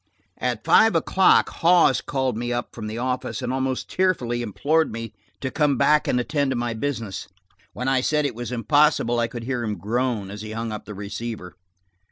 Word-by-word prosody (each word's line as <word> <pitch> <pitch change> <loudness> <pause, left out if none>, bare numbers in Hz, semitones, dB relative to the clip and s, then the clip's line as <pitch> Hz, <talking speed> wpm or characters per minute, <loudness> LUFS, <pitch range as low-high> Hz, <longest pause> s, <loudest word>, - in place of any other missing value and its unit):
At - - -2
five 225 0 +5
o'clock 190 0 +4
Hawes 170 -6 +4
called 130 -4 -1
me 120 +2 -3
up 120 0 -3
from 110 -2 -6
the 110 +1 -5
office 125 +1 -3
and 125 - -2
almost 130 -1 -2
tearfully 130 -11 0
implored 150 +9 +1
me 115 -1 -6 0.3
to 130 - -3
come 150 -4 +2
back 150 +4 +3
and 125 - +2
attend 145 +2 0
to 130 - -1
my 120 -1 -1
business. 115 -5 -4 0.5
When 125 - -4
I 135 -1 +2
said 150 +2 +1
it 140 - -1
was 120 +2 -6
impossible, 120 0 +2
I 115 - +1
could 120 0 -7
hear 125 -1 -2
him 105 -2 -3
groan 115 -2 -1
as 105 0 -7
he 110 0 -7
hung 115 0 -3
up 105 - -6
the 105 - -8
receiver. 105 -1 -6
120 Hz, 200 wpm, -23 LUFS, 115-140 Hz, 0.5 s, five